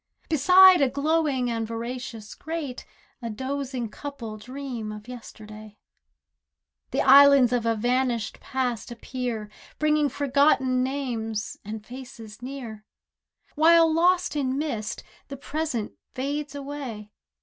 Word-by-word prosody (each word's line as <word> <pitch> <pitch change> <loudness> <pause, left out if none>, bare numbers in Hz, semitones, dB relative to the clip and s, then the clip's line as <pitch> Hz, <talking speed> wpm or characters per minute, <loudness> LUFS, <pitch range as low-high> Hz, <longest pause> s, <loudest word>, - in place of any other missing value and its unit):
Beside 365 +4 +7
a 275 - +4
glowing 285 -3 0
and 225 -1 -2
voracious 230 -1 -6
grate 310 -6 -6 0.3
A 235 - -4
dozing 260 +1 -3
couple 235 -2 -7
dream 245 -1 -6
of 210 +1 -9
yesterday; 215 -3 -11 1.1
The - - 0
islands 275 -2 +7
of 235 -2 0
a 230 - +2
vanished 240 0 0
past 250 -4 -3
appear, 240 -2 -4 0.3
Bringing 300 -1 +2
forgotten 275 -2 +2
names 240 -5 -3
and 215 +1 -7
faces 240 -3 -10
near; 245 -5 -7 0.7
While 325 +1 +5
lost 355 +1 +2
in 270 -2 -1
mist, 240 -8 -3 0.2
the 275 - -7
present 285 -5 -3 0.2
fades 285 +2 -3
away. 270 -7 -7
255 Hz, 115 wpm, -25 LUFS, 225-285 Hz, 1.1 s, Beside